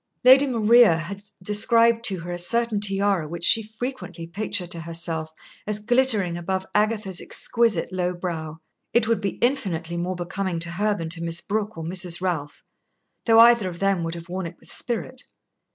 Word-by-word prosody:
Lady 265 +3 +7
Maria 230 -6 +5
had 190 +4 -6 0.2
described 230 +3 +3
to 190 -6 +1
her 175 +1 -7
a 175 - -4
certain 230 +4 0
tiara 195 -4 0
which 170 +2 -7
she 225 - +7
frequently 220 -5 -7
pictured 180 0 -3
to 170 - -5
herself 165 -1 -5 0.4
as 210 -1 0
glittering 215 -5 +3
above 190 +2 -3
Agatha's 210 -3 0
exquisite 230 -5 0
low 180 -1 -1
brow. 165 -3 -5 0.4
It 235 -2 +3
would 230 -2 +1
be 200 -2 -3
infinitely 180 - -1
more 180 +2 -2
becoming 180 0 -3
to 170 +1 -2
her 205 +4 0
than 165 -4 -5
to 165 0 -3
Miss 170 0 0
Brooke 215 +1 -3
or 165 - -5
Mrs. 175 0 -2
Ralph, 165 -6 -4 0.6
though 225 0 +7
either 235 -4 +5
of 170 - -9
them 195 -2 0
would 165 0 -4
have 170 0 -9
worn 180 0 -4
it - - -11
with - - -10
spirit. 250 +1 -4
190 Hz, 180 wpm, -23 LUFS, 170-220 Hz, 0.6 s, Lady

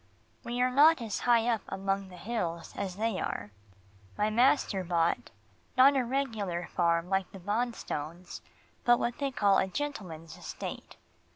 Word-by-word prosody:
We 240 +1 -3
are 255 - +2
not 300 +4 +6
as 225 -3 -3
high 235 -1 +3
up 230 -3 +1
among 195 0 -2
the 180 - -12
hills 170 -5 -3
as 190 -2 -3
they 220 -1 -1
are. 105 +1 -4 0.7
My 210 +1 +1
master 235 -4 +3
bought, 170 -7 0 0.5
not 275 +2 +7
a 265 - +2
regular 225 -9 -2
farm 170 0 +2
like 190 0 0
the - - -9
Bonstones, 185 -5 -3 0.4
but 240 0 +5
what 240 0 -2
they 280 -1 0
call 200 -7 +3
a 190 - +1
gentleman's 185 - -5
estate. - - -7
205 Hz, 155 wpm, -30 LUFS, 180-240 Hz, 0.7 s, not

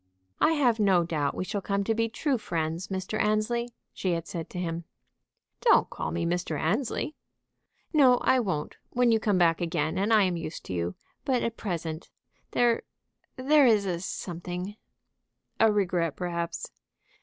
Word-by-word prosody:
"I 325 - +4
have 250 -7 +2
no 190 -4 +4
doubt 150 -4 -1
we - - -2
shall 200 +2 -3
come 200 +1 -1
to 225 - +1
be 230 +1 0
true 260 +3 -1
friends, 165 -1 -2
Mr. 190 +2 -3
Annesley," 215 +3 +1 0.2
she 185 -2 -1
had 165 -1 -2
said 165 -2 -5
to - - -8
him. 170 -1 -3 0.8
"Don't 465 - +4
call - - -3
me 170 0 -2
Mr. 170 -3 -1
Annesley." 230 - -1 0.8
"No, 260 -5 +6
I 260 - +4
won't, 185 -10 -2
when 245 -1 +3
you 225 - +4
come 210 -3 +1
back 170 -2 +3
again 170 -1 -1
and 205 +3 +1
I 215 -2 +6
am 180 -2 0
used 165 -1 -6
to - - -5
you. 85 0 -2 0.3
But 255 -3 +1
at 230 -1 -2
present 165 -5 -4 0.4
there 240 -1 +2 0.5
there 280 +1 +5
is 215 -4 +4
a 175 -3 -1
something 180 +2 -5 0.4
" - - -54
"A 225 -1 +6
regret, 180 -6 0
perhaps?" 170 -1 -3
190 Hz, 170 wpm, -28 LUFS, 170-225 Hz, 0.8 s, No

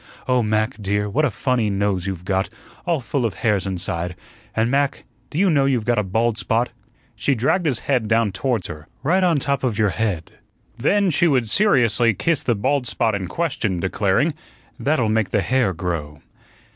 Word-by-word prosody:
Oh, 125 -1 +3
Mac, 110 +2 -1
dear, 100 +1 0
what 140 +10 +1
a - - +2
funny 125 -2 0
nose 100 -2 0
you've 90 -2 -5
got, 95 0 0 0.4
all 165 -5 +1
full 125 +2 -2
of 110 -7 -1
hairs 100 -1 0
inside; 90 -1 -3 0.4
and, 115 +2 +1
Mac, 140 0 0 0.3
do 150 - -6
you 195 +3 +4
know 145 -6 +3
you've 125 -5 +1
got 120 -2 +2
a - - +1
bald 110 +3 0
spot 115 +4 0 0.2
" - - -37
she 140 - +1
dragged 155 - +1
his 130 -6 +1
head 125 -6 +1
down 115 -1 +2
towards 105 +1 -1
her 75 -2 -8 0.2
"right 180 +6 +2
on 175 -3 +3
the - - -2
top 140 -1 -1
of 120 -5 0
your 110 -2 +3
head." 95 -6 -2 0.4
Then 190 - +2
she 170 +3 +3
would 130 -7 +2
seriously 120 - +3
kiss 165 - +1
the 120 - +1
bald 130 +4 0
spot 110 -1 0
in 95 -2 -2
question, 130 - -1
declaring: 100 - +1 0.5
"That'll 140 -6 +1
make 110 -2 +1
the 105 - +1
hair 130 -3 +1
grow." 80 -4 -4
115 Hz, 195 wpm, -21 LUFS, 100-135 Hz, 0.5 s, you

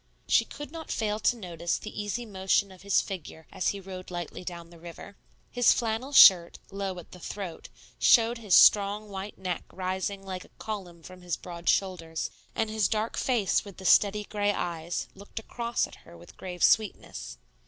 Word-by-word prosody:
She - - +4
could 295 -1 -9
not 325 -1 -8
fail 210 -1 -1
to 240 +3 +2
notice 175 -4 -3
the 210 0 -6
easy 205 +4 -3
motion 195 -1 0
of 185 - -15
his 200 0 +3
figure 160 -4 -8
as - - -2
he 200 - 0
rowed 185 -1 -9
lightly 175 0 -6
down 170 -1 -8
the 170 - -15
river. 170 +4 -10 0.4
His 245 -1 +5
flannel 230 +4 -2
shirt, 180 -10 +8
low 195 -1 -4
at 175 - -11
the 180 - -12
throat, 185 -1 -7 0.3
showed 230 0 +5
his 210 -6 +3
strong 205 +1 +5
white 195 +1 -7
neck 180 -3 -3
rising 190 +2 -3
like 185 -1 -5
a - - -19
column 180 -6 -6
from 185 +1 -12
his 175 -1 -3
broad 170 -1 -5
shoulders, 165 -4 -1 0.2
and 225 - 0
his 220 -3 +2
dark 220 +1 -1
face 235 -7 +1
with 200 -3 -12
the 190 - -10
steady 210 +2 +4
gray 205 0 0
eyes 170 -3 -3
looked 200 +3 -16
across 235 +1 -2
at - - -13
her 85 - -15
with 85 - -15
grave 180 -2 -6
sweetness. 205 - +1
195 Hz, 185 wpm, -28 LUFS, 180-210 Hz, 0.4 s, shirt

